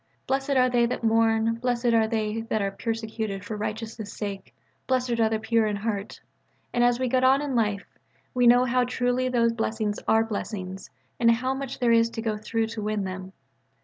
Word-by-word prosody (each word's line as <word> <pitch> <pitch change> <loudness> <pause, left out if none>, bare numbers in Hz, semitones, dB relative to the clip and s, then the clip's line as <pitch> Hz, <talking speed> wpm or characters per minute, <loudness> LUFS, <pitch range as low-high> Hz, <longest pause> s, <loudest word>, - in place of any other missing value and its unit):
"Blessed 270 +1 0
are 255 0 +5
they 240 -1 +2
that 245 - -4
mourn: 225 0 +2
Blessed 245 -1 +1
are 225 -1 +4
they 220 0 -1
that 220 - +1
are 200 -1 -1
persecuted 220 -2 -4
for 215 - -4
righteousness' 215 0 -5
sake: 200 -2 -6 0.4
Blessed 250 -2 0
are 220 -1 +4
the 220 - 0
pure 225 0 +1
in 210 - -1
heart." 205 -1 -4 0.5
And 240 - +2
as 245 0 +3
we 260 - 0
get 255 +1 +1
on 265 +1 +5
in 290 -2 -3
life, 210 -4 0 0.5
we 245 -2 +3
know 245 +1 +7
both 255 - 0
how 250 +1 +3
truly 250 +1 0
those 235 -2 +2
blessings 220 -2 -2
are 225 0 +4
blessings, 195 -3 -5 0.3
and 230 - +5
how 255 +3 +2
much 270 -1 -5
there 240 -2 +2
is 230 0 +4
to 225 - -5
go 220 -2 0
through 225 +1 -1
to 225 -1 -5
win 210 -1 -1
them. 185 0 -6
230 Hz, 205 wpm, -26 LUFS, 215-245 Hz, 0.5 s, know